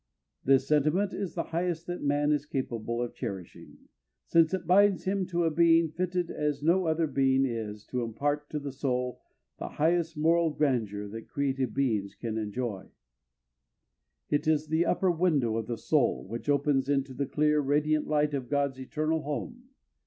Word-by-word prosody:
This 135 0 +3
sentiment 155 +7 +2
is 195 -4 -4
the - - -1
highest 170 -1 -1
that 175 0 -5
man 145 +1 +1
is 150 -1 0
capable 120 -4 -3
of 120 - -5
cherishing, 95 -3 -7 0.5
since 165 -1 +4
it 185 -2 -2
binds 195 +2 +4
him 190 -1 -1
to 175 -1 0
a 165 - +2
being 165 0 +4
fitted 180 +1 -2
as 150 -1 -2
no 175 +2 +3
other 160 +1 +2
being 135 -2 +2
is 110 -4 -4
to 125 - -3
impart 145 +6 -2
to 150 - -3
the 145 -1 -4
soul 125 -2 -2 0.4
the - - -4
highest 165 0 +1
moral 165 +2 +3
grandeur 115 -9 -1
that 115 +2 -8
created 135 -3 -1
beings 110 -8 0
can 110 -2 -4
enjoy. 105 -2 -4 1.4
It 145 - +1
is 155 -1 +1
the 160 +2 +2
upper 185 -2 +2
window 155 -10 +1
of 115 - -3
the 120 -1 -3
soul, 145 -2 +1
which 115 +7 -5
opens 140 -1 +2
into 135 -1 0
the 140 +1 -2
clear, 150 +1 +2
radiant 150 +2 +1
light 150 -1 +1
of 130 -3 -3
God's 140 -2 0
eternal 155 +4 -1
home. 235 - -5
145 Hz, 170 wpm, -29 LUFS, 130-165 Hz, 1.4 s, since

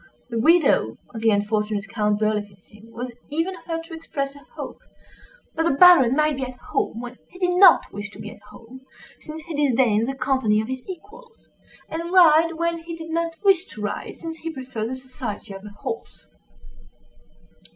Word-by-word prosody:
The 230 - -1
widow 290 - +4 0.2
of 225 - -6
the 225 - +4
unfortunate 210 0 0
Count 210 -2 0
Berlifitzing 210 0 -4
was 245 +2 -5 0.2
even 330 +6 -1
heard 330 -1 -3
to 330 - -12
express 280 -4 -4
a - - -12 0.2
hope - - -7 0.7
"that - - -1
the 325 -4 +2
Baron 340 -9 +8
might 305 -1 +2
be 270 - -2
at 255 -1 -6
home 230 -1 -2
when 245 0 -9
he 360 - -14
did 360 -1 +1
not 380 +2 +6
wish 205 0 -5
to - - -14
be 210 - -7
at - - -15
home, 250 +2 -13 0.4
since 310 0 -9
he 330 0 -7
disdained 250 -6 +2
the 270 - -3
company 260 -5 +1
of 220 - -2
his 260 -1 -4
equals; 455 +6 -12 0.4
and 335 +2 -5
ride 330 -2 +6
when 335 +1 -1
he 335 0 -7
did 325 0 -8
not 335 0 -1
wish 385 -3 +4
to 215 - -11
ride, 210 - -4
since 325 -1 -7
he 330 - -5
preferred 255 -7 -5
the 260 - -3
society 255 -6 -7
of 195 0 -9
a 210 - -8
horse." 205 +1 -7
265 Hz, 185 wpm, -23 LUFS, 220-330 Hz, 0.7 s, Baron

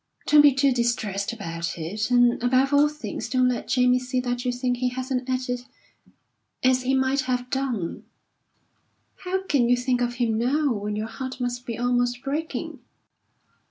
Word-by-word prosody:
Don't 300 0 +7
be 290 -1 +7
too 270 +1 +2
distressed 235 -5 -1
about 170 -7 -5
it, 200 +8 -3
and, 245 -1 +4
above 260 +3 +2
all 290 +1 +5
things, 235 -6 -6
don't 255 0 +3
let 250 - -3
Jamie 250 0 +3
see 250 0 -2
that 245 -1 -2
you 250 - 0
think 245 0 -1
he 250 0 0
hasn't 255 0 -3
acted 250 -1 -2 1.0
as 255 0 +3
he 260 +1 +1
might 265 +1 +1
have 250 0 -1
done." 250 -10 -2 1.1
"How 380 +1 -3
can 270 -10 +2
you 245 - +4
think 250 0 0
of 240 0 -1
him 230 -3 0
now, 275 +3 +1
when 210 0 -3
your 215 +1 -2
heart 260 +3 -6
must 245 0 -3
be 230 - -4
almost 245 0 0
breaking?" 300 +4 -4
250 Hz, 170 wpm, -24 LUFS, 240-260 Hz, 1.1 s, Don't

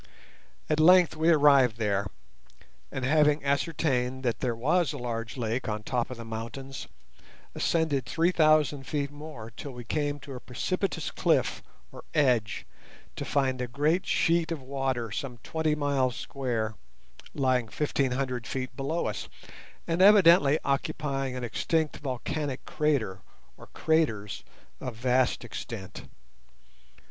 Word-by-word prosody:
At 155 0 +1
length 180 +1 +6
we 160 +2 +2
arrived 140 -7 +5
there, 100 -3 0 0.8
and, 130 -1 -3
having 150 +1 +3
ascertained 140 -3 0
that 120 -4 0
there 120 -3 -1
was 155 +6 +2
a - - -5
large 115 -1 -4
lake 115 0 -2
on 105 0 -3
top 125 0 -1
of 125 - -7
the 115 - -8
mountains, 115 +4 -6 0.7
ascended 150 -6 0
three 165 +5 +2
thousand 155 -4 +3
feet 145 -2 -2
more 145 -7 -9
till 145 - -7
we 120 0 -8
came 145 +3 -1
to 140 0 -9
a 125 - -6
precipitous 185 +11 -2
cliff - - +1 0.3
or - - -11
edge, 125 -8 +2 0.5
to - - -4
find 130 -3 0
a 125 - -2
great 155 +9 0
sheet 170 0 +2
of 165 - -2
water 130 -4 -2
some 125 +3 -4
twenty 160 -1 0
miles 140 -4 0
square 120 -5 -3 0.6
lying 130 -3 +1
fifteen 140 0 0
hundred 125 -3 -2
feet 130 -1 -4
below 145 +6 -2
us, - - -4 0.6
and 170 +2 0
evidently 175 -7 +7
occupying 135 -1 -1
an 125 - -4
extinct 155 +6 -1
volcanic 140 +1 -4
crater 135 - 0 0.3
or - - -14
craters 110 - 0 0.4
of 125 -3 -5
vast 125 +1 +1
extent. 105 -4 -7
135 Hz, 135 wpm, -28 LUFS, 120-155 Hz, 0.8 s, evidently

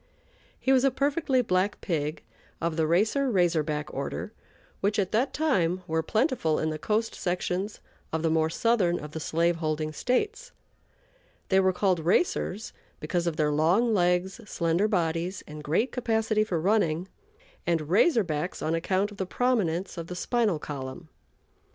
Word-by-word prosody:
He 265 - +1
was 260 -1 +4
a 275 - +5
perfectly 275 0 +1
black 185 0 0
pig 155 -3 -2 0.4
of 165 -1 -1
the 160 -1 +1
"Racer 220 - +2
Razor 175 -6 +3
Back" 150 0 -4
order, 140 +9 -4 0.5
which, 205 +2 0
at 195 -3 0
that 250 +5 +1
time, 185 - +1
were 160 0 0
plentiful 215 - +1
in 155 - 0
the 155 - -4
coast 220 +6 0
sections 180 +3 -2 0.3
of 160 0 -2
the 165 - +2
more 160 0 +2
southern 185 -2 +2
of 150 - -8
the 160 - -5
slave 170 +2 +1
holding 155 -1 -2
States. 425 - -1 1.0
They 190 - +4
were 190 0 +4
called 185 -1 +1
"racers" 195 - 0 0.3
because 175 -1 -1
of 165 - 0
their 150 -1 +2
long 175 +11 +3
legs, 180 +2 +1
slender 170 +4 +1
bodies, 175 -1 -1
and 150 0 -9
great 165 - +1
capacity 220 -3 +1
for 185 -6 -1
running; 180 -2 +1 0.6
and 165 -3 +1
"Razor 225 - +4
Backs" 155 +1 -3
on 160 - 0
account 190 +5 0
of 205 - -12
the 190 - -3
prominence 190 -8 0
of 165 - -6
the 180 - -6
spinal 220 -2 +1
column. 145 +2 -7
180 Hz, 165 wpm, -27 LUFS, 160-220 Hz, 1.0 s, a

